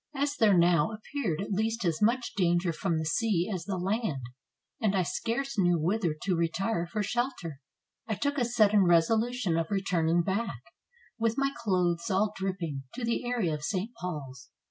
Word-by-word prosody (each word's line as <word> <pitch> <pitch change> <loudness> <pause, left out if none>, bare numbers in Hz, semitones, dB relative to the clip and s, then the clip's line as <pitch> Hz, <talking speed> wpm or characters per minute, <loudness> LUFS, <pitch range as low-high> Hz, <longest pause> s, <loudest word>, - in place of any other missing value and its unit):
As 285 +1 0
there 210 -7 +4
now 170 +1 +4
ap 215 - -8
peared 195 - -1
at 200 - -5
least 220 +2 0
as 165 0 0
much 235 +3 +2
danger 175 -2 +1
from 170 0 -1
the 160 - -2
sea 180 +2 +1
as 175 -3 -4
the 190 -1 -2
land, 185 - -1 0.6
and 205 -2 +2
I 185 - +3
scarce 235 +6 -2
knew 175 -2 +4
whither 175 0 0
to 185 -1 +1
retire 170 +2 0
for 210 +5 -2
shelter, 200 - -3 0.5
I 220 - -1
took 285 +5 -1
a 245 - +2
sudden 215 -4 +4
resolution 210 +3 +2
of 165 -1 -1
returning 175 -4 +1
back, 190 - -2 0.6
with 230 0 +1
my 275 0 +1
clothes 180 -3 0
all 205 +2 +1
dripping, 185 -7 -3
to 250 -1 -3
the 235 +2 -1
area 230 -10 0
of 150 - -4
St. 190 +8 -2
Paul's. 140 -8 -6
195 Hz, 180 wpm, -29 LUFS, 170-225 Hz, 0.6 s, there